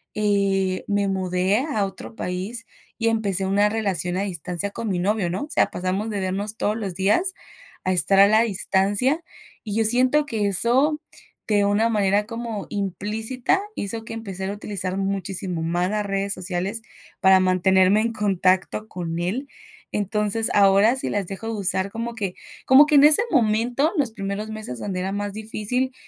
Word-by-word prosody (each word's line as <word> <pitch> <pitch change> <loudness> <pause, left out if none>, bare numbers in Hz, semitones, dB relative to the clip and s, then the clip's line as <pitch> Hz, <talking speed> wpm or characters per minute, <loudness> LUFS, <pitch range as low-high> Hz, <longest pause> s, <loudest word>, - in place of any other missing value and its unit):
eh, 195 -3 0
me 205 -1 0
mudé 185 +1 0
a 255 -8 -1
otro 195 +3 -9
país, 200 +5 -4 0.3
y 230 -1 +1
empecé 200 -4 0
una 200 +2 +2
relación 195 -5 -1
a 195 - -1
distancia 180 +1 -3
con 225 0 -5
mi 185 - -1
novio, 195 0 0
¿no? 185 +8 -3
O 300 - -8
sea, - - +3
pasamos 185 +4 -3
de 205 -3 -3
vernos 200 +4 -2
todos 210 - 0
los 200 -5 -5
días 210 - +1 0.5
a 185 - 0
estar 195 +2 +3
a 200 - +8
la 215 +2 +4
distancia, 205 - +1 0.4
y 210 -3 -5
yo 225 0 +2
siento 255 +6 +5
que 220 -6 -1
eso, 255 - +4 0.5
de 205 -1 +3
una 205 +3 +2
manera 205 -2 +1
como 230 -2 -6
implícita, 220 - -2
hizo 220 +3 -4
que - - -10
empezara 195 -4 -5
a - - -5
utilizar 195 -3 -3
muchísimo 195 -2 -2
más 175 +2 -1
las 210 0 -2
redes 195 0 -1
sociales 185 +4 -4 0.4
para 190 0 +6
mantenerme 185 +2 +3
en 230 +1 -1
contacto 195 0 0
con 170 -2 -5
él. 210 +11 -3 0.5
Entonces, 210 +2 +1
ahora 200 +4 +4
sí - - -2
las 205 -2 -2
dejo 195 +4 -7
de 225 - -3
usar 195 -2 0
como 230 +1 -5
que 200 -5 -4 0.3
como 265 +3 +7
que 300 0 +1
en 285 +1 +7
ese 300 +6 +8
momento, 245 +3 +1
los 270 -6 +1
primeros 200 0 -5
meses 215 - -6
donde 185 - -4
era 190 +2 -3
más 205 0 -3
difícil, 220 +4 -3
205 Hz, 175 wpm, -23 LUFS, 190-225 Hz, 0.5 s, a